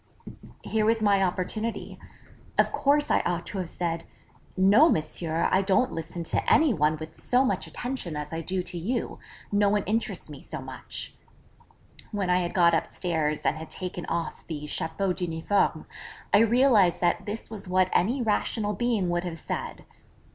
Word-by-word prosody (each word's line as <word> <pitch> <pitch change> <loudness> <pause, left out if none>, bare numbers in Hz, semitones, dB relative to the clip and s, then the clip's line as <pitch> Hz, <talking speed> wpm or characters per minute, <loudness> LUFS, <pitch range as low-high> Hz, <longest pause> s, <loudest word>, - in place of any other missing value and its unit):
Here 220 -1 0
was 225 0 +2
my 200 -2 +4
opportunity; 195 +5 -2 0.6
of - - +4
course 290 +1 +2
I - - +4
ought 175 -1 -2
to 195 - -4
have 180 -3 -3
said, 170 -1 -3 0.5
'No, 205 - +6
Monsieur, 160 - 0
I 190 - +4
don't 200 +7 +2
listen 165 +1 -5
to - - 0
any 305 -4 +5
one 155 -3 +2
with 160 +1 -9
so 255 +2 +2
much 260 - -1
attention 245 - -5
as 150 +1 -5
I 165 - -2
do 185 +2 -2
to 180 -1 -6
you: 230 +7 -2 0.3
no 205 0 +3
one 205 0 +1
interests 225 +4 -2
me - - -10
so - - -6
much.' - - -7 1.0
When 200 -4 -1
I 180 - +4
had 175 -1 -3
got 170 -2 +5
upstairs 160 -2 -1
and 155 - +2
had 160 - -8
taken 180 -1 -5
off 170 -1 -3
the 150 -2 -5
chapeau 160 +5 -1
d'uniforme, 175 +2 0 0.5
I 200 - +8
realised 225 -5 +4
that 175 - +1
this 220 +2 -5
was 210 -3 -7
what 185 0 +2
any 245 +7 +2
rational 210 -1 0
being 220 -3 0
would 175 0 0
have 175 -2 -5
said. - - -5
185 Hz, 170 wpm, -27 LUFS, 170-215 Hz, 1.0 s, I